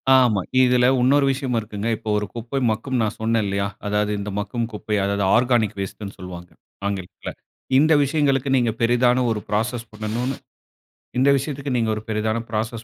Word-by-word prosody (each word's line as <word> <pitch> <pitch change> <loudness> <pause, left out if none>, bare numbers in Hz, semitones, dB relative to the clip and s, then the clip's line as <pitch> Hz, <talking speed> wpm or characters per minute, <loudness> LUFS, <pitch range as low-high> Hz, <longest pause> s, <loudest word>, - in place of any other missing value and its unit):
ஆமா. 120 -6 +4 0.2
இதுல 125 0 +4
இன்னொரு 140 +3 +4
விஷயம் 135 -2 -2
இருக்குங்க. 105 0 -5
இப்ப - - -15
ஒரு 105 - -1
குப்பை 120 +4 -3
மக்கும் 125 +3 -2
நான் 110 -2 -1
சொன்னன் 115 0 +1
இல்லையா, 100 0 -1 0.2
அதாவது 105 0 0
இந்த 100 +1 -4
மக்கும் 115 +3 -2
குப்பை, 105 0 -3
அதாவது 100 0 0
ஆர்கானிக் 120 -4 +2
வேஸ்ட்டுன்னு 100 +1 -6
சொல்லுவாங்க 90 -1 -9 0.4
ஆங்கிலத்துல. 95 -3 -5 0.5
இந்த 155 +3 +5
விஷயங்களுக்கு 140 -2 +1
நீங்க 120 -3 +2
பெரிதான 120 +2 +3
ஒரு 110 - -1
ப்ராசஸ் 115 +3 -1
பண்ணணும்னு 115 +5 -3 0.8
இந்த 130 +2 +4
விஷயத்துக்கு 140 0 -3
நீங்க 115 -2 +1
ஒரு 110 - -5
பெரிதான 110 +1 0
ப்ராசஸ் 110 +1 -3
115 Hz, 160 wpm, -22 LUFS, 105-125 Hz, 0.8 s, இந்த